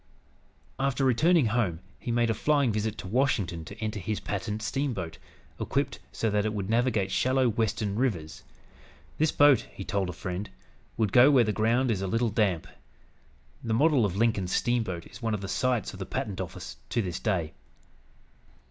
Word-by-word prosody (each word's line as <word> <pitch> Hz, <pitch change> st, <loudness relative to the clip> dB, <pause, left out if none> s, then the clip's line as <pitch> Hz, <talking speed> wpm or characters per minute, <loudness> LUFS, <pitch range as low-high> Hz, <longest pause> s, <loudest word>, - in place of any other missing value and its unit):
After 135 Hz, 0 st, +1 dB
returning 155 Hz, +5 st, +4 dB
home 105 Hz, -7 st, 0 dB, 0.2 s
he -, -, -7 dB
made 120 Hz, -1 st, +2 dB
a -, -, +2 dB
flying 140 Hz, +2 st, +2 dB
visit 110 Hz, 0 st, -2 dB
to -, -, -7 dB
Washington 100 Hz, -8 st, 0 dB
to 100 Hz, -, -10 dB
enter 110 Hz, -1 st, -3 dB
his 105 Hz, +2 st, -3 dB
patent 105 Hz, +1 st, -4 dB
steamboat, 110 Hz, -, -2 dB, 0.4 s
equipped -, -, -1 dB
so 110 Hz, -, -1 dB
that 105 Hz, 0 st, +2 dB
it 110 Hz, 0 st, -2 dB
would 100 Hz, 0 st, -3 dB
navigate 115 Hz, -5 st, +1 dB
shallow 130 Hz, +3 st, +2 dB
western 110 Hz, -3 st, 0 dB
rivers. 100 Hz, -11 st, -2 dB, 0.8 s
This 155 Hz, 0 st, +3 dB
boat, 145 Hz, -2 st, +5 dB
he 95 Hz, -, -7 dB
told 95 Hz, -2 st, -1 dB
a -, -, -4 dB
friend, 95 Hz, +2 st, -5 dB, 0.5 s
"would 110 Hz, -4 st, +1 dB
go 125 Hz, +3 st, +8 dB
where 135 Hz, -4 st, +6 dB
the 105 Hz, -1 st, 0 dB
ground 115 Hz, +4 st, +2 dB
is 100 Hz, -4 st, -1 dB
a 95 Hz, -, -2 dB
little 115 Hz, +4 st, +1 dB
damp." 100 Hz, -6 st, +1 dB, 1.0 s
The 115 Hz, -1 st, 0 dB
model 145 Hz, -1 st, +4 dB
of 95 Hz, -3 st, 0 dB
Lincoln's 105 Hz, -5 st, +1 dB
steamboat 110 Hz, -8 st, 0 dB
is -, -, -13 dB
one 115 Hz, -2 st, 0 dB
of 100 Hz, -, -5 dB
the 100 Hz, -, -5 dB
sights 115 Hz, +4 st, 0 dB
of -, -, -10 dB
the -, -, -5 dB
Patent -, -, -3 dB
Office 60 Hz, 0 st, -7 dB
to 115 Hz, -, 0 dB
this 90 Hz, -3 st, -4 dB
day. 90 Hz, -8 st, -1 dB
110 Hz, 180 wpm, -28 LUFS, 100-125 Hz, 1.0 s, go